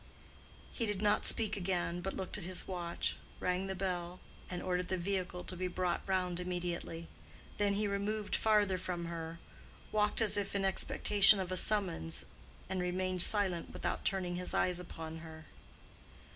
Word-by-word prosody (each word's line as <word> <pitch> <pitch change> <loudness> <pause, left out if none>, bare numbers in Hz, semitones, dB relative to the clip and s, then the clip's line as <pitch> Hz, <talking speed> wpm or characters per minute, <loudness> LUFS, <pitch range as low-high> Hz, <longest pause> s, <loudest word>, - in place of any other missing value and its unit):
He 230 - -1
did 205 -2 -1
not 210 0 +2
speak 220 -2 +1
again, 175 -2 -1
but 195 +2 -3
looked 190 - -4
at 210 - -4
his 185 +1 -4
watch, 175 -2 -2 0.2
rang 180 +1 0
the 190 - -3
bell, 180 -1 -2 0.3
and 180 -1 -4
ordered 180 -1 0
the 185 - 0
vehicle 180 -1 -2
to 185 - -2
be 185 +1 -1
brought 180 -1 -1
round 180 -2 0
immediately. 175 -2 -3 0.5
Then 205 -1 +2
he 210 +1 +1
removed 205 +1 -1
farther 205 -4 +3
from 175 -1 -3
her, 165 -1 -5 0.5
walked 210 -1 +2
as 220 -2 +5
if 200 0 -2
in 195 -1 +1
expectation 200 +1 +5
of 185 -1 -3
a - - 0
summons, 185 - +2 0.4
and 185 -1 -1
remained 185 0 0
silent 190 -4 +3
without - - -2
turning 180 -2 0
his 180 - -1
eyes 180 -1 +2
upon 165 -2 -7
her. 160 -1 -10
185 Hz, 165 wpm, -34 LUFS, 175-200 Hz, 0.5 s, as